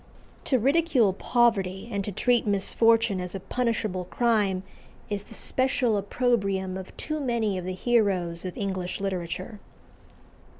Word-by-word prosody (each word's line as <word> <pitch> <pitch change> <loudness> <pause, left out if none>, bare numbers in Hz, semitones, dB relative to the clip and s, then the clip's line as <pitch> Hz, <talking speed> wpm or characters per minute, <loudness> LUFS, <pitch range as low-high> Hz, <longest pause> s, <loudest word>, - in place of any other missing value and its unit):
To 260 - +3
ridicule 265 - +3
poverty, 200 -4 +1
and 200 -2 -1
to 205 - -4
treat 240 +4 +2
misfortune 210 0 +2
as 180 +1 -6
a - - -3
punishable 215 -4 -1
crime, 205 -4 +1 0.5
is 205 0 -2
the - - -10
special 260 -3 +1
opprobrium 200 -3 0
of 190 0 -8
too 310 0 -2
many 235 -7 0
of 180 - -7
the 185 0 -3
heroes 190 -7 +1
of 185 -1 -6
English 190 -2 -3
literature. 185 +2 -4
205 Hz, 135 wpm, -26 LUFS, 185-235 Hz, 0.5 s, To